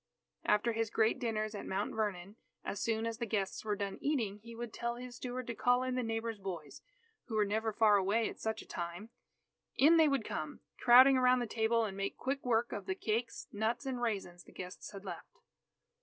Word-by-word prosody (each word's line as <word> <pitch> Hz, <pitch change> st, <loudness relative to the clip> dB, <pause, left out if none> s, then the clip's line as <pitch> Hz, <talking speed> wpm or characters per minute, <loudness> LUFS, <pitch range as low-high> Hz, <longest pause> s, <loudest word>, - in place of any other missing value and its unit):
After 210 Hz, +3 st, +3 dB
his 225 Hz, 0 st, 0 dB
great 220 Hz, +3 st, +2 dB
dinners 215 Hz, -3 st, -1 dB
at 205 Hz, -, -6 dB
Mount 195 Hz, +2 st, -2 dB
Vernon, 205 Hz, -3 st, -2 dB, 0.3 s
as 200 Hz, -, -3 dB
soon 225 Hz, -1 st, 0 dB
as 230 Hz, 0 st, -3 dB
the 235 Hz, -, -2 dB
guests 200 Hz, -3 st, -1 dB
were 210 Hz, -1 st, 0 dB
done 200 Hz, -1 st, -4 dB
eating, 230 Hz, -9 st, 0 dB
he 230 Hz, +2 st, -11 dB
would 235 Hz, -1 st, -6 dB
tell 235 Hz, 0 st, -2 dB
his 245 Hz, 0 st, -8 dB
steward 255 Hz, 0 st, -4 dB
to 235 Hz, -, -3 dB
call 245 Hz, +3 st, +3 dB
in 255 Hz, 0 st, -1 dB
the 255 Hz, -, 0 dB
neighbours' 225 Hz, -1 st, -2 dB
boys, 175 Hz, -7 st, -6 dB, 0.4 s
who 230 Hz, -, -5 dB
were 210 Hz, -1 st, +3 dB
never 220 Hz, +2 st, 0 dB
far 210 Hz, -1 st, +5 dB
away 205 Hz, +4 st, +2 dB
at -, -, -8 dB
such 220 Hz, 0 st, -2 dB
a -, -, -20 dB
time. 175 Hz, +6 st, -5 dB, 0.6 s
In 315 Hz, +5 st, +6 dB
they 320 Hz, -1 st, +6 dB
would 275 Hz, -6 st, +1 dB
come, 155 Hz, 0 st, -4 dB, 0.2 s
crowding 260 Hz, +2 st, +8 dB
around 255 Hz, 0 st, +5 dB
the 245 Hz, -, 0 dB
table, 225 Hz, +1 st, +1 dB
and 195 Hz, -3 st, -5 dB
make 195 Hz, 0 st, -3 dB
quick 275 Hz, +2 st, -2 dB
work 240 Hz, -1 st, +1 dB
of 200 Hz, -2 st, -5 dB
the 190 Hz, -, -1 dB
cakes, 225 Hz, +4 st, -2 dB
nuts, 225 Hz, +5 st, -1 dB
and 255 Hz, -2 st, -3 dB
raisins 195 Hz, -6 st, -2 dB
the -, -, -17 dB
guests 185 Hz, 0 st, -8 dB
had 200 Hz, 0 st, -10 dB
left. 185 Hz, -, -8 dB
225 Hz, 215 wpm, -34 LUFS, 205-240 Hz, 0.6 s, crowding